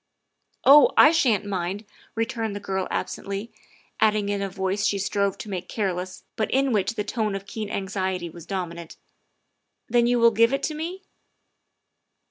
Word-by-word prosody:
" - - -51 0.2
Oh, 285 +2 +8
I 300 - +8
sha'n't 235 - +2
mind," 195 +1 -3 0.3
returned 225 -2 -2
the - - -4
girl 190 -2 -2
absently, 200 +3 -4 0.5
adding 210 -2 +2
in 200 -1 -1
a 195 - -2
voice 190 +1 -2
she 200 - +2
strove 200 0 0
to - - -8
make 185 -3 -5
careless 185 -3 -3
but 220 - -1
in 270 0 +2
which 210 +1 0
the 210 - -2
note 215 -4 0
of 195 0 -6
keen 210 0 -5
anxiety 190 -3 -2
was 170 0 -12
dominant, 170 -4 -5 0.3
' - - -50
' - - -53
then 240 0 +4
you 245 0 +3
will 235 0 +6
give 230 +3 +3
it 275 - -1
to 310 - -1
me?" 340 +5 -5
205 Hz, 180 wpm, -25 LUFS, 190-230 Hz, 0.5 s, Oh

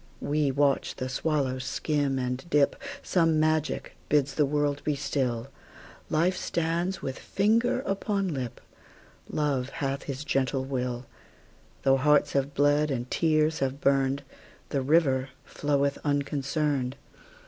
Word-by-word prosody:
We 150 -1 +1
watch 140 0 +1
the 130 - -3
swallow 135 -1 0
skim 140 +1 -1
and 125 0 -2
dip; 145 -3 +3 0.3
Some 165 -3 +2
magic 155 0 0 0.2
bids 145 -2 +2
the 150 0 +2
world 145 0 0
be 150 - 0
still; 125 -3 -1 0.6
Life 175 +4 +2
stands 170 +2 -1
with 135 0 -4
finger 230 +5 +2
upon 195 -3 -1
lip; 125 -4 -4 0.7
Love 140 -4 0
hath 135 0 -3
his 140 0 -4
gentle 135 -3 0
will; 125 -2 -3 0.8
Though 135 0 +5
hearts 145 +1 +3
have 140 0 0
bled, 145 +1 +3
and 125 -2 -3
tears 155 -1 +2
have 135 0 -1
burned, 135 0 +2 0.5
The 140 - 0
river 135 -2 +3 0.2
floweth 140 -1 0
unconcerned. 145 -2 0
145 Hz, 125 wpm, -28 LUFS, 135-155 Hz, 0.8 s, Though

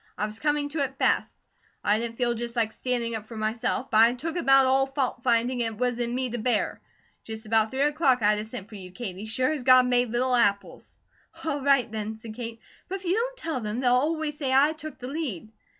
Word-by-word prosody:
I 210 - 0
was 215 +1 -7
coming 295 0 0
to 310 +2 -4
it 270 -1 -2
fast. - - +1 0.5
I 210 +1 +2
didn't 230 0 -4
feel 240 -1 +1
just 235 +1 -5
like 225 -2 +1
standing 240 -2 -2
up 215 -1 -5
for 225 - -9
myself; 220 +4 -2
but 215 - +4
I'd 235 +2 +5
took 330 +6 -4
about 270 -6 +5
all 265 +1 +3
fault 270 -3 -2
finding 245 +1 +1
it 225 -2 -2
was 245 0 -1
in 240 0 -1
me 260 0 -1
to 240 - -3
bear. 240 +3 0 0.4
Just 220 0 -7
about 220 0 +2
three 265 +3 -3
o'clock 290 -5 +2
I'd 210 0 +3
a - - -3
sent 220 -2 -8
for 225 - -16
you, 190 -3 -9
Katie, 200 -1 -6
sure 255 +6 +1
as 305 -3 -2
God 255 0 +6
made 245 -1 +2
little 250 +2 0
apples." 200 -4 0 0.5
"All 290 -3 -1
right 275 -4 +3
then," 220 0 -4
said 220 0 -9
Kate, 230 0 -6 0.3
"but 380 - -2
if 385 -1 -8
you 350 - +2
don't - - -1
tell 325 - -3
them, 215 +2 -3
they'll 250 -1 +3
always 300 +3 0
say 270 -3 -1
I 280 +4 +4
took 310 -1 -9
the 250 - -7
lead." 260 - -4
245 Hz, 235 wpm, -26 LUFS, 225-275 Hz, 0.5 s, God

